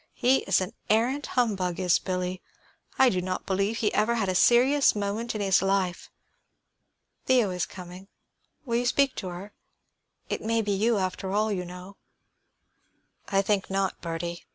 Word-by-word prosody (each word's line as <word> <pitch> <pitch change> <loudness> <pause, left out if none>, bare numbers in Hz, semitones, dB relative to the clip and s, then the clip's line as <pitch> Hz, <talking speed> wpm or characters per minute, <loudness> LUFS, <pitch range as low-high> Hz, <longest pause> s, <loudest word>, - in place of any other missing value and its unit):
"He 255 +2 +3
is 190 -1 +4
an 185 +4 -4 0.2
arrant 245 +7 +1
humbug, 190 -8 0
is 180 -1 +3
Billy; 180 0 -3 0.6
I 265 - +6
do 185 -5 -1
not 185 +1 -4
believe 200 +3 0
he 215 -3 0
ever 220 +3 +2
had 205 -5 0
a - - +1
serious 250 +8 +4
moment 210 +3 -3
in 210 - -2
his 195 -3 +3
life. 195 -2 -1 1.2
Theo 245 -7 +3
is 180 -1 -2
coming; 180 +1 -11 0.6
will 235 -2 0
you 245 0 0
speak 275 +2 +2
to 190 - -4
her? 180 +3 -8 0.7
It - - -3
may 225 0 0
be 205 - -2
you, 215 +3 +2
after 190 0 -3
all, 215 +2 +1
you 180 -3 -2
know." 180 +2 -10 1.3
"I 195 0 +1
think 200 -1 0
not, 195 -1 -1
Bertie." 170 0 -5
195 Hz, 165 wpm, -27 LUFS, 185-230 Hz, 1.3 s, I